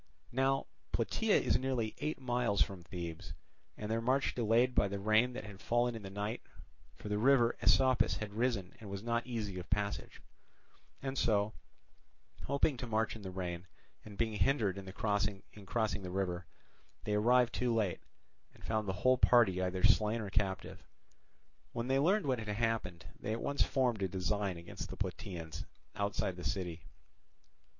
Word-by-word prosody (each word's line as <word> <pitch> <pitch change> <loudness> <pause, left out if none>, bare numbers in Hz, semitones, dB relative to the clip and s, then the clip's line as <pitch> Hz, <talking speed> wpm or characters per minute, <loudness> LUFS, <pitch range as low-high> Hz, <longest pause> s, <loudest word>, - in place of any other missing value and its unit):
Now 135 +2 +2 0.3
Plataea - - +2
is 120 - +2
nearly 125 -4 -1
eight 155 -1 -2
miles 120 -5 +2
from 95 -3 -8
Thebes, 85 -3 -6 0.4
and 105 0 -4
their 115 +1 +1
march 130 +4 +2
delayed 120 +2 +3
by 100 - +3
the 100 +1 -3
rain 110 +5 +3
that 120 - -5
had 105 -1 -10
fallen 120 +1 +2
in 115 - -6
the 95 - -7
night, 105 +4 -3 0.5
for - - -9
the 105 0 0
river 120 -1 +5
Asopus 125 +6 +4
had 105 -1 -5
risen 110 -5 0
and 105 -3 -9
was 100 +1 -5
not 115 +1 -1
easy 105 -6 -3
of 90 - -9
passage; 100 +1 -2 0.8
and 135 0 -2
so, 105 -1 +2 0.9
having 140 0 +2
to 125 - -4
march 110 0 0
in 110 - -9
the 95 - -6
rain, 90 -1 -4 0.4
and 105 -2 -11
being 110 0 0
hindered 105 -3 +2
in 95 -1 -8
crossing 100 -1 0
the 105 -2 -2
river, 90 -2 -2 0.6
they 105 - -1
arrived 120 +3 +4
too 125 -1 0
late, 110 -5 +1 0.6
and - - -18
found 110 -2 0
the 95 - 0
whole 130 0 +5
party 105 -7 +5
either 95 0 -1
slain 105 +2 +4
or 105 -3 -5
captive. 100 -2 -2 0.9
When 115 +1 -2
they 135 +1 +3
learned 190 +9 +3
what 130 -3 +1
had 110 - -6
happened, 105 -5 -1
they 105 +2 -2
at 115 - -3
once 140 - 0
formed 125 -6 +2
a 95 - +2
design 95 +1 -1
against 85 +1 -7
the - - -7
Plataeans 80 - -5 0.3
outside 100 -2 -1
the 90 - -7
city. 90 -2 -3
105 Hz, 170 wpm, -34 LUFS, 95-120 Hz, 0.9 s, river